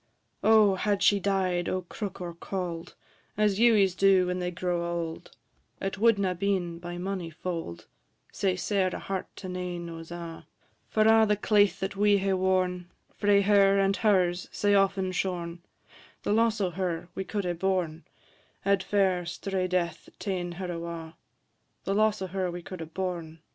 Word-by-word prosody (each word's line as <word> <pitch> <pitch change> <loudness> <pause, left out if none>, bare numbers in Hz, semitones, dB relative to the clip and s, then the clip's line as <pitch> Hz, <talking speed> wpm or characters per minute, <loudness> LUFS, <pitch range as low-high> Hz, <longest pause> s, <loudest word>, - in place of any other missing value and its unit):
O! 215 -2 +6
had 200 +1 0
she 205 - +5
died 185 -3 0
o' 185 0 -1
crook 195 +2 -6
or 175 -2 -5
cauld, 170 -1 -5 0.4
As 210 -2 +2
Ewies 215 -6 +5
do 195 -1 +5
when 180 0 -2
they 180 0 -1
grow 180 -1 -2
auld, 170 -1 -4 0.4
It 195 0 -3
wad 230 0 +5
na 190 -2 0
been, 180 -2 -1
by 175 0 -6
mony 185 -2 -3
fauld, 165 - -5 0.5
Sae 190 -2 0
sair 190 +1 +1
a - - -3
heart 195 -1 -4
to 190 - -8
nane 180 -2 -4
o's 165 0 -9
a': 170 -1 -8 0.4
For 215 - +3
a' 220 0 +6
the 210 - +3
claith 205 -1 +3
that 195 +1 -2
we 205 0 +4
hae 195 0 0
worn, 185 -1 0 0.3
Frae 205 -1 +4
her 200 -1 +5
and 195 0 +3
her's 185 -4 +2
sae 205 0 +1
aften 195 -1 +2
shorn, 180 -2 -3 0.6
The - - +1
loss 225 0 +2
o' 190 -3 0
her 175 -1 -3
we 190 - -3
could 200 0 -3
hae 175 - 0
born, 175 -3 -1 0.6
Had 200 0 +2
fair 190 -2 +1
strae 190 +1 -2
death 180 -2 -2
ta'en 180 -3 -3
her 180 0 -5
awa'; 165 -1 -6 0.7
The 195 - -1
loss 210 -1 +2
o' - - -3
her 190 -2 0
we 175 0 -6
could 185 0 -8
hae 165 - -6
born, 170 -2 -4
&c. 165 - -26
185 Hz, 175 wpm, -28 LUFS, 175-200 Hz, 0.7 s, O